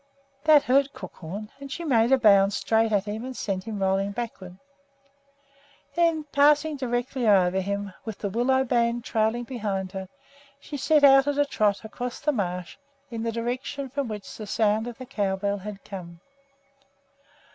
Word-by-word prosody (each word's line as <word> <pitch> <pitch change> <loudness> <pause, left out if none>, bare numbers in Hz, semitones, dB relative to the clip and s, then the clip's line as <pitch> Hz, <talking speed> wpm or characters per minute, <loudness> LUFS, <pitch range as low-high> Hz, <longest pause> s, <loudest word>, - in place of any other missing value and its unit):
That 305 -2 +7
hurt 275 +2 +2
Crookhorn, 190 +3 -8
and 275 -1 -9
she 340 - -5
made 240 -6 +3
a 265 - +6
bound 200 -4 +5
straight 225 +2 +1
at 200 -2 +1
him 215 +2 -4
and 260 0 -6
sent 190 -1 -3
him 220 -2 -4
rolling 195 +1 0
backward. 195 -6 -6 1.4
Then, 335 -2 +2
passing 295 +2 +4
directly 245 -1 -2
over 190 -2 +4
him, 200 0 -3
with 220 -3 -6
the 200 - -3
willow 260 +4 +2
band 235 -1 +1
trailing 220 +2 0
behind 205 -7 -3
her, 190 -1 -6 0.5
she 290 - -8
set 295 +2 +3
out 270 0 +7
on 290 -1 0
a 290 - +4
trot 210 -5 0
across 245 +3 -5
the 300 - +1
marsh 180 -7 -3 0.3
in 230 -1 -4
the 230 0 -1
direction 250 +4 -4
from 280 -1 -2
which 210 -3 -7
the 215 - -7
sound 215 +1 +1
of 240 -1 -7
the 255 - -8
cow 205 -6 -1
bell 200 +1 -2
had 200 0 -8
come. 170 -4 -9
225 Hz, 170 wpm, -26 LUFS, 200-265 Hz, 1.4 s, That